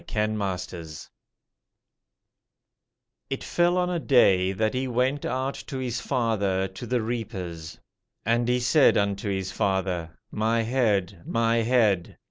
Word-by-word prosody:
The 105 - -4
Oldest 100 -4 -1
Drama 85 -3 -8 2.4
_"It - - -3
fell 175 +1 +2
on 180 0 +1
a 175 - 0
day, 95 - +4
that 110 +3 0
he 130 +1 -1
went 130 +3 0
out 130 +2 -1
to 135 - -5
his 125 -3 -3
father 100 -7 0
to 95 +6 -9
the 120 -1 0
reapers. 95 -9 -5 0.5
And 120 +2 +2
he 125 0 +2
said 135 +4 +4
unto 100 0 0
his 95 -1 -2
father, 95 -4 -1
My 115 +2 +1
head, 105 -7 0
my 115 0 +1
head. 110 -6 +2
110 Hz, 135 wpm, -26 LUFS, 95-125 Hz, 2.4 s, day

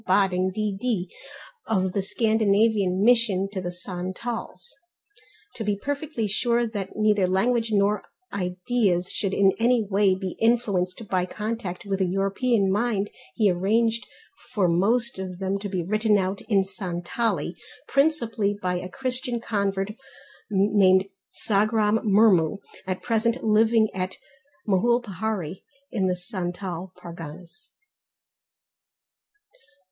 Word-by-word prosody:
Bodding, 185 -1 +3
D.D. 205 -1 -2 0.5
of 190 -3 +1
the 200 - +1
Scandinavian 210 -2 +2
Mission 225 -5 +3
to 190 -2 -3
the 175 -1 -4
Santals. 185 - -5 0.8
To 225 - -3
be 205 -1 0
perfectly 285 0 -3
sure 235 +3 +1
that 205 -4 -5
neither 210 -3 +3
language 230 +5 +1
nor 205 0 +2 0.3
ideas 185 0 0
should 195 -3 -2
in 195 0 +4
any 235 0 +3
way 195 -1 +3
be 190 -1 -5
influenced 215 -4 +1
by 185 -2 0
contact 210 -3 -4
with 195 -1 -1
a 185 - +2
European 195 +3 +1
mind 205 -1 0 0.2
he 210 -3 +4
arranged 225 +6 +1 0.4
for 205 -7 +2
most 215 +6 +1
of 185 -1 -5
them 195 +1 -1
to 200 0 -5
be 185 -3 -2
written 215 +3 +2
out 190 +1 -1
in 200 -3 +4
Santali, 185 -1 -2 0.3
principally 235 -9 +1
by 180 -2 -1
a 180 - -7
Christian 250 +2 -3
convert 200 -3 -1 0.6
named 195 -2 +4 0.2
Sagram 215 0 +2
Murmu, 200 -5 +4 0.3
at 185 -1 -3
present 230 +1 0
living 220 +1 +4
at 185 0 -3 0.5
Mohulpahari 205 -4 0 0.3
in 195 -6 0
the 180 - +1
Santal 180 -1 -5
Parganas. 170 - -9
200 Hz, 120 wpm, -25 LUFS, 185-225 Hz, 0.8 s, in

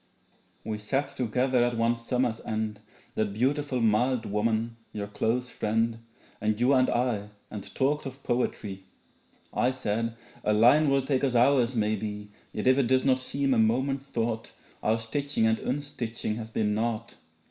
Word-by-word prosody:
We 110 -1 -3
sat 135 +7 -1
together 125 0 +1
at 120 -1 0
one 115 +1 +2
summer's 120 -1 -1
end 110 -1 -2 0.3
That 105 -2 -1
beautiful 135 +3 0
mild 115 +2 +2
woman 110 +2 0 0.2
your 105 -1 -3
close 115 +4 -1
friend 115 +1 0 0.4
And 110 0 0
you 125 +3 +4
and 130 -1 +4
I, 120 -4 0 0.2
and 105 -2 -7
talked 145 +2 +1
of 135 +1 -10
poetry. 105 -5 -2 0.7
I 125 - +2
said 115 -3 -2 0.3
'a 105 - +2
line 125 +8 +6
will 135 -1 +3
take 135 -1 +1
us 130 -3 +1
hours 125 0 +4
maybe, 105 -1 -2 0.2
Yet 105 - -4
if 130 +1 +5
it 130 - +2
does 130 +1 +3
not 130 -1 +4
seem 135 +1 0
a 115 - +3
moment's 130 +5 +1
thought 115 -2 -2 0.3
Our 110 +1 +2
stitching 125 +2 -1
and 110 0 +2
unstitching 120 -5 -3
has 110 -1 -6
been 105 -2 0
naught. 115 +1 -2
115 Hz, 160 wpm, -28 LUFS, 110-130 Hz, 0.7 s, line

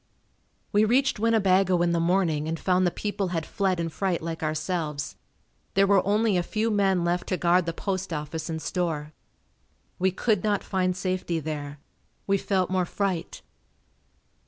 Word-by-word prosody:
We 210 0 +4
reached 255 +3 +2
Winnebago 195 -5 +3
in 175 - +2
the 170 - +1
morning 165 -3 +1
and 165 0 -2
found 185 -1 +2
the - - +3
people 205 +1 -3
had 165 -3 -2
fled 190 -3 0
in 165 -1 -1
fright 185 +1 -1
like 165 0 -4
ourselves. 155 -1 -2 0.6
There 195 0 +5
were 195 -1 +4
only 210 0 +2
a - - +2
few 220 +5 -1
men 195 -4 +2
left 175 +1 0
to 185 - 0
guard 175 0 +3
the - - +1
post 190 0 -3
office 155 +1 -4
and 160 -1 -3
store. 155 -1 -2 0.9
We 190 +1 +3
could 200 +1 0
not 205 -2 +1
find 185 -1 0
safety 185 -3 -1
there. 145 -2 -5 0.5
We 195 0 +2
felt 185 -2 0
more 185 -1 +1
fright. 190 -4 -3
185 Hz, 165 wpm, -26 LUFS, 165-195 Hz, 0.9 s, There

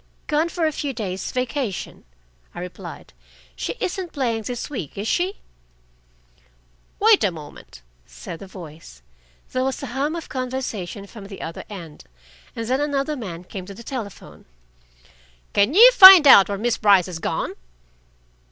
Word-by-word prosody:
"Gone 310 +2 0
for 340 -1 -2
a 310 - +1
few 285 -2 -4
days' 195 -5 -5
vacation," 250 - -4 0.5
I - - -6
replied. 180 0 -9 0.4
"She - - -4
isn't 365 -1 -4
playing 235 -6 -1
this 245 +3 -5
week, 200 - -7
is 205 +2 -4
she?" 365 - -1 1.6
"Wait 435 0 +5
a 200 - +3
moment," 150 - -12 0.2
said 165 - -9
the 195 - -10
voice. 160 - -12 0.5
There 255 - -1
was 265 +1 -3
a 260 - -6
hum 285 +5 -1
of 335 - -7
conversation 250 -7 -5
from 200 -1 -12
the 195 -1 -9
other 165 - -7
end, 170 -7 -10 0.5
and 230 -1 -5
then 260 +3 0
another 290 0 -1
man 180 - -7
came 185 0 -9
to 200 - -9
the 235 - -11
telephone. 230 -7 -8 1.1
"Can 205 +9 +2
you 480 +5 +9
find 380 -8 +10
out 205 -9 +8
where 200 - -2
Miss 235 +3 -1
Brice 200 -4 +5
has 180 -3 -7
gone?" - - -3
235 Hz, 155 wpm, -22 LUFS, 190-285 Hz, 1.6 s, find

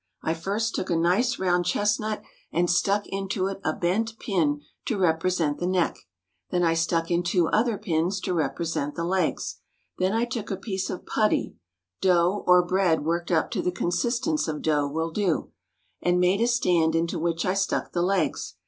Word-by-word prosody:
I 160 - +1
first 205 +7 -2
took 185 - -3
a 170 - +2
nice 190 +9 +2
round 180 -1 +1
chestnut, 210 +3 0 0.3
and 175 +1 +1
stuck 200 +3 +2
into 195 -1 -2
it 195 0 -3
a - - +1
bent 220 +8 -1
pin 155 -10 0 0.2
to 225 - -1
represent 165 -3 +1
the 175 - -1
neck; 185 -2 +1 0.5
then 180 -1 +1
I 165 -1 +3
stuck 165 0 0
in 170 0 +3
two 175 -1 +1
other 225 0 +2
pins 180 0 0
to 185 - -2
represent 160 -1 -2
the 170 - -3
legs; 180 -1 -1 0.4
then 185 +1 +2
I 230 +2 +2
took 235 -3 -5
a 195 - -2
piece 195 -1 -3
of 180 - -6
putty 215 -1 +1 0.5
(dough, 180 +1 +3
or 180 0 +6
bread 175 -4 +1
worked 170 +1 -1
up 165 -3 +1
to - - -1
the 180 - 0
consistence 235 - 0
of 150 -1 -4
dough, 150 -2 +2
will 160 +3 -2
do), 185 -3 -1 0.5
and 175 0 +2
made 180 +4 +3
a 235 - +3
stand 175 -9 +2
into 165 +1 0
which 165 0 -1
I 185 - +2
stuck 195 0 -1
the 175 - 0
legs. 195 +2 0
180 Hz, 185 wpm, -26 LUFS, 165-195 Hz, 0.5 s, or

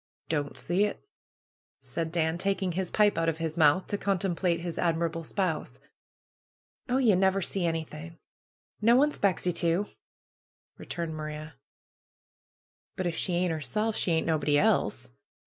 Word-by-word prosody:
^^Don't 145 -3 -2
see 185 +4 +1
it!" 210 - -5 0.8
said 165 -1 -3
Dan, 165 0 0
taking 195 -1 0
his 180 +1 -2
pipe 210 -4 +3
out 165 0 +2
of 160 - -2
his 160 -1 -3
mouth, 160 +2 +4
to 205 - -3
contemplate 180 -3 0
his 170 -1 -4
admirable 165 -1 0
spouse. 180 -1 -2 1.1
^^Oh, 260 +1 +2
ye 215 - +6
never 190 +1 +3
see 185 -1 -1
anything! 165 0 -5 0.6
No 230 +3 +5
one 290 +4 +4
'spects 195 - 0
ye 180 - +1
to!" 170 +4 +1 0.9
returned 170 -2 -4
Maria. 155 0 -6 1.4
"But 185 - -3
if 170 -2 -1
she 180 - -1
ain't 175 0 +1
'erself, 210 - -1
she 175 - +1
ain't 160 - +1
nobody 150 -3 +2
else. - - +1
170 Hz, 145 wpm, -28 LUFS, 160-190 Hz, 1.4 s, ye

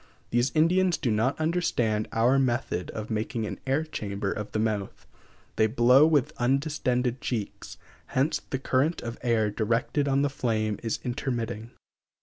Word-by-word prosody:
These 120 +3 +2
Indians 175 +3 +3
do 120 - -1
not 115 +7 +1
understand 140 -10 0
our 120 +4 +3
method 120 -8 -1
of 110 0 -6
making 110 +1 -2
an - - -5
air 135 +4 +2
chamber 100 -9 -4
of 105 -1 -5
the - - -2
mouth; 110 -3 -2 0.5
they 110 - +4
blow 125 +5 +5
with 150 -5 +2
undistended 125 -2 0
cheeks, 110 -5 -4 0.3
hence 135 +4 0
the 135 - -1
current 135 +5 0
of 115 0 -6
air 115 -4 +1
directed 115 +7 0
on 140 0 +2
the - - +3
flame 110 -5 -1
is 115 -2 -1
intermitting. 120 -3 -3
120 Hz, 150 wpm, -27 LUFS, 110-135 Hz, 0.5 s, blow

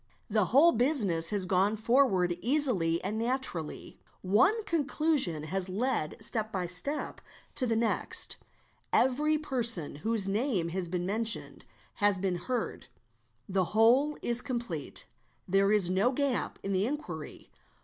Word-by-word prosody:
The 210 -2 +3
whole 285 - +5
business 215 - +1
has 205 -3 -1
gone 190 +3 +1
forward 220 -6 +2
easily 230 - +2
and 210 +4 -3
naturally; 230 - -3 0.2
one 245 - +3
conclusion 300 - +1
has 185 +4 -2
led 205 -5 -2
step 220 -2 -2
by 185 -2 -2
step 230 - -4 0.3
to 255 - +1
the 230 - 0
next; 225 0 +1 0.5
every 300 +4 +2
person 235 - -1
whose 215 +3 0
name 200 -4 -1
has 180 0 -3
been 175 0 -2
mentioned 220 +3 +1 0.3
has 205 -2 +2
been 185 -1 -1
heard; 240 +6 -4 0.6
the 190 -1 0
whole 260 +7 +4
is 240 0 +2
complete; 235 - -4 0.4
there 195 +2 +2
is 200 -4 +4
no 200 +7 +2
gap 275 -1 -2
in 195 - -2
the 190 +3 +1
inquiry. 180 - -7
215 Hz, 135 wpm, -29 LUFS, 185-255 Hz, 0.6 s, whole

